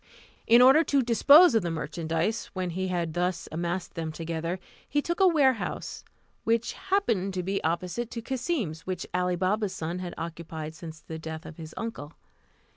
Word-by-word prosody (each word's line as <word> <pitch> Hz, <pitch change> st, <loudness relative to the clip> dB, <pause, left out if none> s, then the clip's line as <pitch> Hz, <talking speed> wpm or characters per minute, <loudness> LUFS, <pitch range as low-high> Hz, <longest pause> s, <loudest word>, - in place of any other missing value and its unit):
In 235 Hz, +2 st, +8 dB
order 270 Hz, +5 st, +7 dB
to 275 Hz, -1 st, +2 dB
dispose 280 Hz, +8 st, +7 dB
of 225 Hz, -, +4 dB
the 175 Hz, -, -2 dB
merchandise, 165 Hz, +6 st, -2 dB
when 185 Hz, -3 st, -2 dB
he 185 Hz, +2 st, -2 dB
had 170 Hz, -3 st, -2 dB
thus 175 Hz, 0 st, -1 dB
amassed 175 Hz, +2 st, -3 dB
them 160 Hz, -1 st, -4 dB
together, 165 Hz, +2 st, -3 dB, 0.3 s
he 290 Hz, -, +2 dB
took 345 Hz, +5 st, -2 dB
a 385 Hz, -, +6 dB
warehouse, 270 Hz, -, +1 dB, 0.4 s
which 230 Hz, +1 st, +1 dB
happened 230 Hz, -, 0 dB
to 180 Hz, -, -1 dB
be 195 Hz, +2 st, -2 dB
opposite 180 Hz, +8 st, -2 dB
to 235 Hz, -, -5 dB
Cassim's, 250 Hz, -, -2 dB
which 185 Hz, -1 st, -3 dB
Ali 180 Hz, 0 st, +1 dB
Baba's 190 Hz, +3 st, 0 dB
son 165 Hz, +3 st, -3 dB
had 180 Hz, -1 st, -6 dB
occupied 160 Hz, -1 st, -6 dB
since 160 Hz, 0 st, -9 dB
the 160 Hz, 0 st, -7 dB
death 160 Hz, 0 st, -7 dB
of 155 Hz, -, -10 dB
his 160 Hz, -1 st, -9 dB
uncle. 225 Hz, -10 st, -5 dB
180 Hz, 175 wpm, -28 LUFS, 165-230 Hz, 0.4 s, In